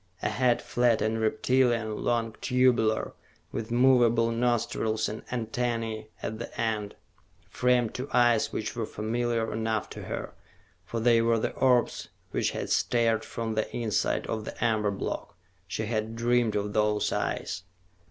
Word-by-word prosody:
A - - +1
head 120 +2 +2
flat 120 -2 +2
and 110 +1 0
reptilian, 120 -2 +2
long, 115 -2 0
tubular, 125 -4 +2 0.4
with 115 0 -4
movable 120 -2 +4
nostrils 115 -2 0
and 110 - -5
antennae 115 -2 -2
at 110 0 -4
the 115 - -7
end, 110 -3 -1 0.6
framed 125 -2 +2
two 130 +3 -5
eyes 120 -2 +3
which 110 +1 -3
were 115 -2 -2
familiar 115 +1 -1
enough 110 -1 -1
to - - -7
her, - - -5 0.5
for 115 - -4
they 115 0 +4
were 115 0 +3
the 110 - -1
orbs 125 -2 +2 0.2
which - - +1
had - - -4
stared 115 -2 +2
from 115 -1 -4
the 110 0 -1
inside 110 -3 0
of 110 -1 -3
the 110 - -3
amber 110 -2 +2
block. 100 -3 -4 0.3
She 110 - -3
had 110 0 -2
dreamed 120 -1 +2
of 105 0 -1
those 105 0 +1
eyes. 100 - -2
115 Hz, 150 wpm, -28 LUFS, 110-120 Hz, 0.6 s, movable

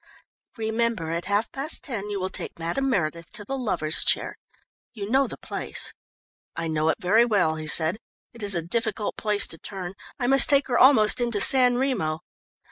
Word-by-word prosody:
"Remember, 220 -6 -2
at 170 +1 -3
half 205 +3 -1
past 280 +4 -3
ten 210 -7 -5
you 205 -1 -3
will 185 0 -4
take - - -6
Madame 175 +12 -2
Meredith 170 -6 -2
to 210 -3 -7
the 270 - -4
Lovers' 195 - -1
Chair - - 0 0.6
you 205 -4 -6
know 270 +1 +3
the - - -7
place?" - - -2 0.6
"I 165 - -4
know 155 0 0
it - - 0
very 215 +4 +3
well," 200 -9 +1
he 155 0 -6
said. 160 +6 +4 0.3
"It 235 - -6
is 200 -2 +3
a 170 - -2
difficult 220 +3 -2
place 210 -2 0
to 165 - -8
turn 185 -3 -7 0.2
I 245 - -3
must 270 +2 +5
take 280 0 +4
her 240 - +1
almost 250 -4 +5
into 235 -3 0
San 250 +2 +6
Remo. 195 - -1
210 Hz, 190 wpm, -24 LUFS, 170-240 Hz, 0.6 s, San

